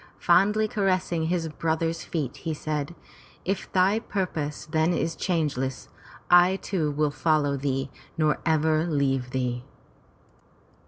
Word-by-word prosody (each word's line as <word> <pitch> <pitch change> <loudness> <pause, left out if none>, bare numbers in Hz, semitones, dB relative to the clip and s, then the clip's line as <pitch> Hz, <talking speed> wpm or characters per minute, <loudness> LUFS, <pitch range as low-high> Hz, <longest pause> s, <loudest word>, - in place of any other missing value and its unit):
Fondly 205 +5 +3
caressing 185 -5 0
his 170 -1 0
brother's 165 +1 -1
feet 145 -7 -3
he 160 -2 -3
said, 150 +1 -3 0.2
" - - -23
If 195 +1 -2
thy 190 +4 +3
purpose 165 -9 -3
then 160 +2 +1
is 165 -1 -1
changeless, 145 -7 -2 0.4
I 175 +1 +6
too 180 -5 -1
will 150 0 0
follow 150 -2 +1
thee 135 -1 -2 0.3
nor 155 -1 +2
ever 160 0 +2
leave 135 -5 0
thee." 125 -1 -2
160 Hz, 125 wpm, -26 LUFS, 145-175 Hz, 0.4 s, I